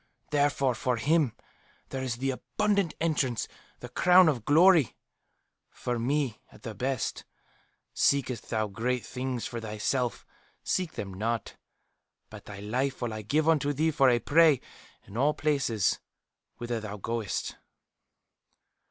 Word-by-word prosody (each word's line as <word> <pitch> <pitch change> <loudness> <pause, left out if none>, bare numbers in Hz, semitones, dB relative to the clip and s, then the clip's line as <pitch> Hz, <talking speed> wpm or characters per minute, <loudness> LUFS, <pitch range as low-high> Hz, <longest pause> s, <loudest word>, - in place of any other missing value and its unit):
Therefore 145 -3 +2
for 125 +1 -1
him 145 0 +2 0.5
there 135 - -4
is 130 -3 -2
the 135 +3 -1
'abundant 200 +5 0
entrance,' 145 -8 0 0.3
the - - -7
'crown 180 0 +6
of 120 -7 -2
glory.' 165 - +5 0.7
For 120 -1 -3
me, 130 -1 -1
at - - -18
the 115 -3 -5
best, 130 +5 -2 0.7
'Seekest 130 -4 +1
thou 110 -1 0
great 120 +5 -2
things 125 -2 -4
for 120 - -4
thyself, 115 +3 -2 0.4
seek 180 -3 -1
them 95 -2 -5
not. 110 +4 -3 0.8
But - - -11
thy 100 -1 -9
life 130 +5 -2
will 115 -2 -2
I 110 - -5
give 150 +9 0
unto 145 -3 +3
thee 160 +3 +1
for 135 -3 +4
a 120 - +4
prey 155 +2 +4 0.5
in 100 - -9
all 145 +4 +2
places 130 -9 +1 0.6
whither 120 -1 -3
thou 105 -1 -6
goest. 115 +1 -3
130 Hz, 135 wpm, -28 LUFS, 115-150 Hz, 0.8 s, crown